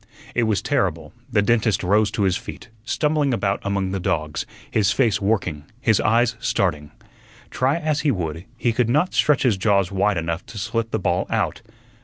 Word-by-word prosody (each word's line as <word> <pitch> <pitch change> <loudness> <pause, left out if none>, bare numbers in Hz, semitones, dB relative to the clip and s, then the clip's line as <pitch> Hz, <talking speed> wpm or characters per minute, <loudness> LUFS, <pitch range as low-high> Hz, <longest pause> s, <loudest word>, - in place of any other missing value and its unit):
It 120 - +1
was 105 - 0
terrible. 85 - -1 0.2
The 105 - +3
dentist 110 -1 +2
rose 105 +3 +3
to 105 - -2
his 95 -2 +2
feet, 115 +2 -8
stumbling 150 +1 +1
about 100 -3 0
among 100 -1 -1
the 95 - -2
dogs, 75 -3 -2 0.2
his 100 -3 +2
face 115 -7 +2
working, 95 -8 -1 0.2
his 110 -5 +2
eyes 115 +1 +2
starting. 90 - -1 0.6
Try 135 +5 +1
as 155 -2 -1
he 155 - +1
would, 85 - -3
he 120 0 +1
could 115 0 +1
not 150 +9 +2
stretch 150 -2 +3
his 120 -7 +3
jaws 100 -1 +2
wide 100 0 +1
enough 85 +1 -2
to 115 - -10
slip 115 +2 -2
the 110 - -1
ball 100 - 0
out. - - -1
105 Hz, 185 wpm, -22 LUFS, 95-120 Hz, 0.6 s, The